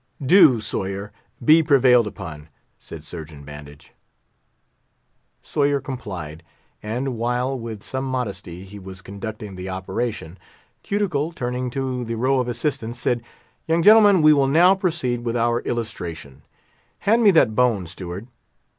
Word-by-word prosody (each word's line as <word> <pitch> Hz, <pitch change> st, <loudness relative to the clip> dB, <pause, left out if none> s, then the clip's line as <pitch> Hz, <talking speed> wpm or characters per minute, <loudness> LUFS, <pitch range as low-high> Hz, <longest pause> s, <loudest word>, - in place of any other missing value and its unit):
"Do, 135 Hz, -, +6 dB
Sawyer; 100 Hz, -1 st, -4 dB, 0.3 s
be 160 Hz, +4 st, +7 dB
prevailed 130 Hz, -6 st, +4 dB
upon," 75 Hz, -6 st, -8 dB, 0.3 s
said 80 Hz, -2 st, -10 dB
Surgeon 80 Hz, -3 st, -9 dB
Bandage. 75 Hz, 0 st, -12 dB, 1.5 s
Sawyer 145 Hz, -1 st, +1 dB
complied; 95 Hz, -, -7 dB, 0.4 s
and 120 Hz, +4 st, -3 dB
while, 125 Hz, +3 st, 0 dB
with 115 Hz, -3 st, -7 dB
some 130 Hz, 0 st, -4 dB
modesty 100 Hz, -8 st, -4 dB
he 100 Hz, +2 st, -11 dB
was 95 Hz, 0 st, -10 dB
conducting 105 Hz, 0 st, -7 dB
the 90 Hz, +1 st, -6 dB
operation, 95 Hz, -1 st, -4 dB, 0.4 s
Cuticle, 175 Hz, -7 st, -1 dB
turning 125 Hz, -3 st, -3 dB
to 130 Hz, -1 st, -3 dB
the 115 Hz, 0 st, -4 dB
row 130 Hz, +3 st, +1 dB
of 125 Hz, -, -1 dB
assistants 120 Hz, -2 st, -2 dB
said, 120 Hz, 0 st, 0 dB, 0.5 s
"Young 165 Hz, +1 st, +2 dB
gentlemen, 205 Hz, -4 st, +7 dB
we 155 Hz, 0 st, +8 dB
will 140 Hz, -2 st, +3 dB
now 170 Hz, +7 st, +6 dB
proceed 170 Hz, -, -1 dB
with 120 Hz, 0 st, -1 dB
our 120 Hz, 0 st, +1 dB
Illustration. 85 Hz, -, -5 dB, 0.6 s
Hand 225 Hz, +3 st, +3 dB
me 215 Hz, -, +6 dB
that 160 Hz, -, +4 dB
bone, 115 Hz, -7 st, +2 dB
Steward." 90 Hz, +3 st, -7 dB
120 Hz, 135 wpm, -22 LUFS, 95-135 Hz, 1.5 s, we